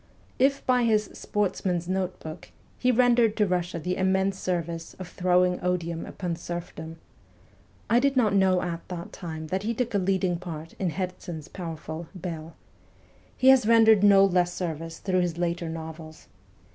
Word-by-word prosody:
If 275 +2 +2
by 250 -1 +3
his 215 -2 +2
' - - -16
Sportsman's 185 -4 -1
Notebook 180 -3 -4 0.2
' - - -33
he 255 - +3
rendered 240 -2 +4
to 210 - +4
Russia 180 -2 -1
the 180 +3 -2
immense 190 +1 +1
service 170 -3 -3
of 185 - -8
throwing 180 0 +2
odium 170 -2 -2
upon 175 -3 -4
serfdom 165 -2 -6 0.9
(I 235 - +4
did 275 +1 +1
not 220 -5 +3
know 190 -2 +3
at 170 -1 -3
that 175 -1 -7
time 160 -3 -6
that 190 +1 -1
he 230 +3 -2
took 240 0 -2
a 200 - +2
leading 185 -2 0
part 165 -3 -7
in 185 - 0
Herzen's 175 -3 -5
powerful 165 -2 -6
' - - -22
Bell 160 -1 -7 0.4
'), - - -31
he 260 - +5
has 265 -4 +6
rendered 225 -3 +6
no 200 -1 +7
less 180 -2 +2
service 165 -2 -4
through 185 -2 0
his 175 -2 -1
later 170 -1 -1
novels. 160 -1 -8
180 Hz, 170 wpm, -26 LUFS, 170-200 Hz, 0.9 s, no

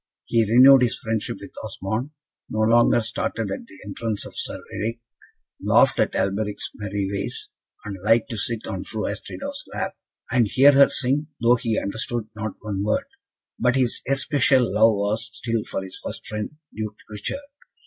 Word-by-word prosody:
He 115 -1 +3
renewed 130 +2 +8
his 120 -2 +2
friendship 110 -1 -3
with - - -10
Osmond, 110 +8 -3 0.4
no 110 - -1
longer 120 +2 +5
started 110 -1 -2
at 115 - -5
the 95 - -15
entrance 105 +1 -3
of - - -10
Sir - - -3
Eric, 115 +2 -3 0.6
laughed - - +4
at - - +2
Alberic's 100 +2 -1
merry 100 -1 -3
ways, 100 - -3 0.3
and 100 -2 -6
liked 115 +2 +3
to 115 - -3
sit 115 +1 -1
on - - -4
Fru - - -4
Astrida's - - -5
lap, - - -2 0.4
and 120 -3 +3
hear 135 +7 +6
her 140 0 +6
sing, 140 +3 +1
though 120 +1 +5
he 115 -2 0
understood 115 +2 -2
not 110 -1 -4
one 100 -2 -3
word; 105 - +1 0.5
but 125 +1 +3
his 125 -3 +1
especial 135 -4 +2
love 110 +1 +5
was 105 +3 -1
still 115 -2 -2
for 95 - -4
his 95 -1 -8
first - - -6
friend, 105 +7 -4 0.2
Duke 110 -1 -4
Richard. 105 - -4
110 Hz, 170 wpm, -24 LUFS, 105-120 Hz, 0.6 s, renewed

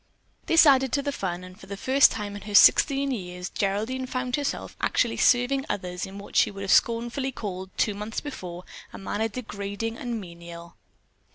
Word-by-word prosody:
This 330 0 +6
added 265 -3 +5
to 280 - +1
the 285 - -1
fun, 185 -7 -4
and 185 +2 -12
for - - -13
the 200 +1 -6
first 265 +6 +5
time 205 -2 -5
in 205 - -8
her 210 -1 -5
sixteen 275 +5 +6
years 180 -5 -5
Geraldine 220 +7 -2
found 255 -1 -2
herself 290 -2 -3
actually - - +1
serving 255 +2 +3
others 180 -1 -3
in 195 +1 -10
what 200 - -11
she - - +5
would 195 -1 -7
have 195 - -1
scornfully 240 +3 +2
called, 190 -6 -6
two 210 - +1
months 210 +2 -4
before, 180 - -7 0.3
a - - -9
manner 210 +3 -2
degrading 220 -1 -5
and 240 -2 -3
menial. 170 -2 -11
210 Hz, 185 wpm, -26 LUFS, 190-255 Hz, 0.3 s, This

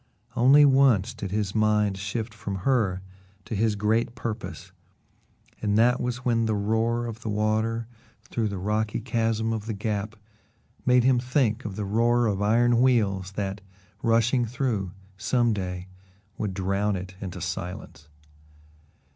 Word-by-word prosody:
Only 140 +5 +7
once 130 -6 +4
did 100 -4 -6
his 100 0 -1
mind 105 -2 +2
shift 105 +3 -4
from 105 -2 -5
her 105 -9 +1 0.4
to - - -6
his 110 +1 +1
great 110 +3 0
purpose, 110 -7 -6 0.9
and 105 -1 +1
that 125 +3 +4
was 125 0 -3
when 115 -2 +2
the 110 - +1
roar 110 +3 0
of 115 -2 -6
the 115 - -5
water 110 +2 0 0.4
through 115 -2 -2
the 100 -1 -4
rocky 105 +3 -1
chasm 115 0 0
of 110 -1 -4
the 110 - -2
Gap 105 +1 -3 0.7
made 125 -1 +5
him 130 -1 +4
think 125 -2 0
of 100 -3 -5
the 105 0 -3
roar 120 +4 +2
of 100 -3 0
iron 120 +3 +3
wheels, 100 -7 +2
that, 100 0 -3 0.4
rushing 115 +2 +3
through, 115 -5 -2 0.3
some 120 +1 +2
day, 90 -2 -4 0.5
would 100 -4 -3
drown 100 +2 0
it 95 0 -6
into 90 -2 -6
silence. 85 -4 -6
110 Hz, 145 wpm, -26 LUFS, 100-120 Hz, 0.9 s, Only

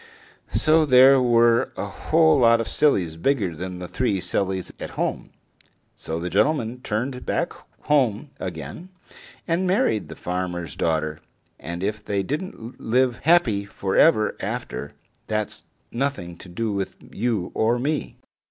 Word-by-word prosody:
So 155 +1 +3
there 130 -1 +7
were 120 -1 +4
a - - -2
whole 160 +8 +3
lot 115 -1 +5
of 115 - -2
sillies 90 - +1
bigger 100 -4 0
than 90 +2 -5
the 90 0 -6
three 105 -1 0
sillies 95 +1 -2
at - - -5
home. - - -2 0.7
So 80 +1 -5
the 85 - -3
gentleman 120 - +1
turned 125 +3 -3
back - - -1 0.3
home 140 -2 +1
again 90 - -6 0.6
and 175 +2 +1
married 185 - +1
the 80 - -8
farmer's 90 -4 -4
daughter, 80 -1 -1 0.4
and 85 +5 -6
if 105 +1 -2
they 100 -2 -1
didn't 140 - -6
live 125 +1 +2
happy 140 -12 +3
for 100 -1 -4
ever 110 -10 +4
after, - - -5 0.3
that's 110 -1 -3 0.3
nothing 120 -10 -2
to 90 - -13
do 110 +5 -2
with 100 -1 -3 0.2
you 110 -5 -1
or 115 +2 +2
me. 145 +5 -2
110 Hz, 145 wpm, -23 LUFS, 90-135 Hz, 0.7 s, there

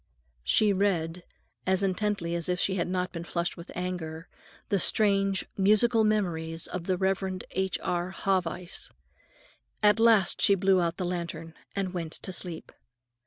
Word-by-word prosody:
She 210 - +3
read, 180 -3 0 0.4
as 190 +1 +2
intently 195 -2 -1
as 170 0 -2
if 180 0 0
she 190 - +1
had 175 -3 -1
not 180 0 -1
been 170 -1 -6
flushed 170 0 -2
with 170 - -11
anger, 175 -2 -4 0.4
the 200 - +2
strange 195 -1 +3
"Musical 215 +4 +4
Memories" 170 -7 0
of 180 -2 -5
the 185 -1 0
Reverend 190 0 -1
H. 190 0 -1
R. 175 0 -1
Haweis. 185 -2 -2 0.9
At 210 +1 +5
last 225 -6 +4
she 200 - +6
blew 190 0 +3
out 170 0 -1
the 185 - -2
lantern 170 -2 -4 0.2
and 195 -2 -2
went 165 -3 -4
to 190 - -3
sleep. 175 -2 -6
185 Hz, 155 wpm, -28 LUFS, 170-195 Hz, 0.9 s, she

